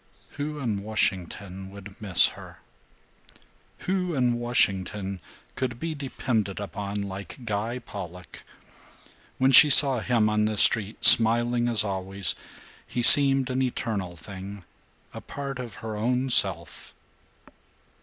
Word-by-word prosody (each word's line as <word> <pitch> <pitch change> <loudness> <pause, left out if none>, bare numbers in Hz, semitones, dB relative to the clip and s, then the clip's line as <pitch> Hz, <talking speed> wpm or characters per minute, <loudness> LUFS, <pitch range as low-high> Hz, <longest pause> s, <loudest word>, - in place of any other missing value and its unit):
Who 150 +1 -5
in 115 -8 -4
Washington 95 -2 -4
would 100 +1 -14
miss 100 -5 +3
her? - - -14 1.2
Who 180 -3 -3
in 120 -2 -1
Washington 100 -4 -2 0.4
could 125 -2 -5
be 165 -1 -5
depended 120 -8 -4
upon 100 0 -6
like 100 +6 -10
Guy 110 +3 -4
Pollock? 90 -7 -11 1.0
When 130 +1 +1
she 150 +3 +8
saw 135 -3 +6
him 115 -2 0
on 105 0 0
the 110 -1 -3
street, 105 0 +1
smiling 120 +1 +4
as 110 -3 +4
always, 95 -1 +1 0.5
he 120 - -4
seemed 135 -1 +6
an 130 +1 -2
eternal 105 -8 -4
thing, 95 +3 -11 0.5
a - - -9
part 140 -2 -8
of 120 -5 -8
her 110 -1 -6
own 125 +4 -2
self. 120 - +2
110 Hz, 125 wpm, -24 LUFS, 100-125 Hz, 1.2 s, she